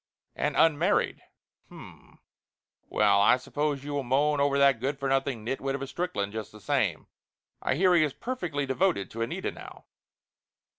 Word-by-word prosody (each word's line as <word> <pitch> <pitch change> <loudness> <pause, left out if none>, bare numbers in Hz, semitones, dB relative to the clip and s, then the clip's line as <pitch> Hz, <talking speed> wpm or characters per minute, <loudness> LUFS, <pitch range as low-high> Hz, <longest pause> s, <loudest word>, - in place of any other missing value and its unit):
And - - -1
unmarried. 165 +5 +2 0.5
H'm! - - -14 0.7
Well, 100 - +3
I 110 - +5
suppose 145 +2 -2
you 145 0 -5
will 145 - 0
moan 140 +3 +1
over 140 0 +2
that 140 -3 +4
good 135 +4 -2
for 140 0 -3
nothing 135 -4 -1
nitwit 135 +2 -2
of 140 - -6
a - - -2
Strickland, 130 - -3
just 110 -1 -6
the 105 - -13
same. 100 - -1 0.6
I - - 0
hear 180 +4 +4
he 170 -3 +5
is 150 - 0
perfectly 175 - -3
devoted 135 - 0
to 115 - -6
Anita 115 - -2
now." - - -12
140 Hz, 165 wpm, -28 LUFS, 130-150 Hz, 0.7 s, I